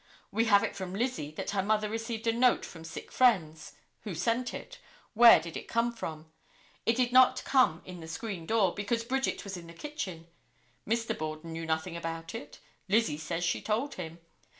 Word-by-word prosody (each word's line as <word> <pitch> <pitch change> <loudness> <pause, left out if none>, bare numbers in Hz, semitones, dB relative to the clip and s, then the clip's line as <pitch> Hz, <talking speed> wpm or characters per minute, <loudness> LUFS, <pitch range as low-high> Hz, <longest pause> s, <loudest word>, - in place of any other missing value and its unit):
We 225 - +2
have 200 -3 +5
it - - -2
from 185 -1 -5
Lizzie 230 - -1
that 155 - -4
her 200 -1 +1
mother 210 +2 +1
received 225 +1 -4
a 230 - +4
note 245 +1 +3
from 165 -2 -10
sick 165 - -8
friends. 160 -11 +2 0.3
Who 200 -5 -6
sent 230 +8 0
it? - - -8 0.3
Where 235 -3 +9
did 165 0 -8
it - - -6
come 230 +1 +1
from? 160 -7 -7 0.6
It 230 - +4
did 250 0 +1
not 255 0 +6
come 255 - +3
in 180 -1 -8
the 160 - -9
screen 175 -1 -5
door, 215 -5 +3
because 230 +3 -1
Bridget 265 +3 -1
was 195 -2 -6
in 170 -1 -10
the 170 - -11
kitchen. 185 - -6 0.6
Mr. 230 +1 0
Borden 155 +1 -5
knew 165 0 -5
nothing 160 +2 -1
about 165 0 -5
it. 145 - -8 0.3
Lizzie 205 -8 +2
says 165 +2 -3
she 170 - 0
told 235 +7 -1
him. 165 -2 -7
200 Hz, 195 wpm, -30 LUFS, 165-230 Hz, 0.6 s, Where